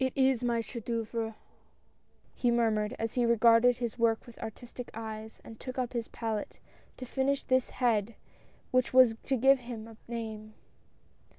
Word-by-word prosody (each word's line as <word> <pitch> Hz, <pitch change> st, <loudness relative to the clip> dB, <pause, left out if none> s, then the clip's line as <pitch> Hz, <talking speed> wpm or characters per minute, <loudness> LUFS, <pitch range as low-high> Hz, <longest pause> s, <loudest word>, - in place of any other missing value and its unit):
"It 260 Hz, -, 0 dB
is 265 Hz, -2 st, +3 dB
my 235 Hz, -1 st, +1 dB
chef 230 Hz, -1 st, -7 dB
d"" 235 Hz, -, -2 dB
oeuvre! 225 Hz, -1 st, -3 dB, 1.0 s
he 245 Hz, -, +1 dB
murmured, 220 Hz, -3 st, +1 dB
as 225 Hz, 0 st, -3 dB
he 245 Hz, -, +1 dB
re 235 Hz, 0 st, +4 dB
garded 235 Hz, +2 st, +5 dB
his 240 Hz, -1 st, -4 dB
work 230 Hz, -1 st, +2 dB
with 240 Hz, -, -14 dB
artistic 240 Hz, +2 st, -8 dB
eyes, 220 Hz, -1 st, -7 dB
and 225 Hz, -, -11 dB
took 255 Hz, 0 st, -7 dB
up 250 Hz, -1 st, -2 dB
his 235 Hz, -2 st, -2 dB
palette 220 Hz, -3 st, -4 dB, 0.4 s
to 255 Hz, -, -6 dB
finish 270 Hz, +2 st, 0 dB
this 255 Hz, -1 st, +2 dB
head 230 Hz, -3 st, 0 dB, 0.6 s
which 255 Hz, 0 st, +2 dB
was 255 Hz, -3 st, +7 dB
to 270 Hz, -, 0 dB
give 270 Hz, +3 st, +5 dB
him 235 Hz, -3 st, -7 dB
a 225 Hz, -1 st, -13 dB
name. 220 Hz, -2 st, -6 dB
235 Hz, 175 wpm, -30 LUFS, 225-250 Hz, 1.0 s, was